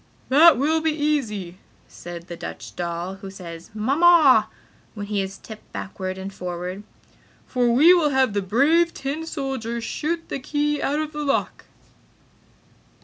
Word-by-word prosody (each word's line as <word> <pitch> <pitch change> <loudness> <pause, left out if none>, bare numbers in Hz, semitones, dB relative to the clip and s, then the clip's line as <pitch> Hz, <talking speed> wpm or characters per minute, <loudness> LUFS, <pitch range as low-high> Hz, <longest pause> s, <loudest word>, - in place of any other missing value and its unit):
"That 310 +3 +7
will 315 +5 +1
be 320 - +1
easy!" 245 - -2 0.3
said 175 -1 -9
the 175 - -7
Dutch - - -8
doll 175 +2 -4
who 195 0 -9
says 170 -3 -10
"Mamma" 275 -1 +5 0.5
when 205 -1 -5
he 205 -1 -1
is 195 0 -5
tipped 220 -1 -13
backward 185 -1 -5
and 190 +1 -7
forward, 180 +1 -5 0.6
"For 245 -2 +1
we 305 +9 +7
will 335 -4 +3
have 265 -5 +2
the 205 - 0
brave 300 - +2
tin 290 +4 -4
soldier 260 -6 -3
shoot 330 +8 -3
the - - -4
key 295 +2 -1
out 285 - 0
of 310 0 -3
the 300 0 -4
lock!" 280 -1 -1
250 Hz, 150 wpm, -23 LUFS, 190-300 Hz, 0.6 s, That